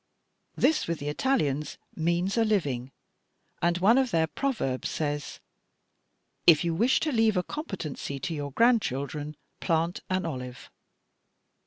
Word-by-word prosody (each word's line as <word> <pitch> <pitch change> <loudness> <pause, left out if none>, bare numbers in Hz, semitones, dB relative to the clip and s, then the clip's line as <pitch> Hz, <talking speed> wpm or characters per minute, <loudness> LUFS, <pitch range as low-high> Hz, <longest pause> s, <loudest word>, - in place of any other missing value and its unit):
This 315 - +2
with 170 -1 -1
the 145 0 -4
Italians 150 - 0 0.2
means 175 +3 0
a 230 - +3
living, 140 - 0 0.7
and 170 0 +2
one 215 +8 +5
of 265 -2 +1
their 165 -6 +2
proverbs 160 - -2
says, 145 -2 -3 1.1
'If 165 -2 +7
you 170 -1 0
wish 230 +10 +3
to 310 - 0
leave 225 -5 +3
a 180 - +2
competency 175 - -5
to 140 +5 -3
your 145 -2 -4
grandchildren, 150 - +1 0.2
plant 165 0 0
an 185 -1 0
olive.' 125 -5 -6
170 Hz, 135 wpm, -28 LUFS, 145-220 Hz, 1.1 s, If